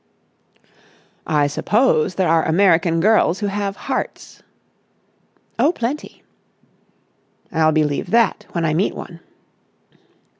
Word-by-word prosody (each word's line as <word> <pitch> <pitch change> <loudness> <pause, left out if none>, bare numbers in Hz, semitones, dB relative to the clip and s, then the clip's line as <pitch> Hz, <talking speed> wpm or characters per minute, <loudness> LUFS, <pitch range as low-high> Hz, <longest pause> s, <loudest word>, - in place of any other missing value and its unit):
"I 150 -2 +2
suppose 185 - +1
there 185 -1 +1
are 165 0 +3
American 165 -1 +2
girls 205 -3 +3
who 210 - -3
have 200 0 -3
hearts." - - -5 1.2
"Oh, 305 - +4
plenty." 275 -1 -5 1.3
"I'll 160 -2 +2
believe 150 -2 -1
that 230 -3 +1
when 170 -2 -1
I 155 - 0
meet 180 +6 0
one." 170 -1 -9
175 Hz, 105 wpm, -19 LUFS, 160-205 Hz, 1.3 s, Oh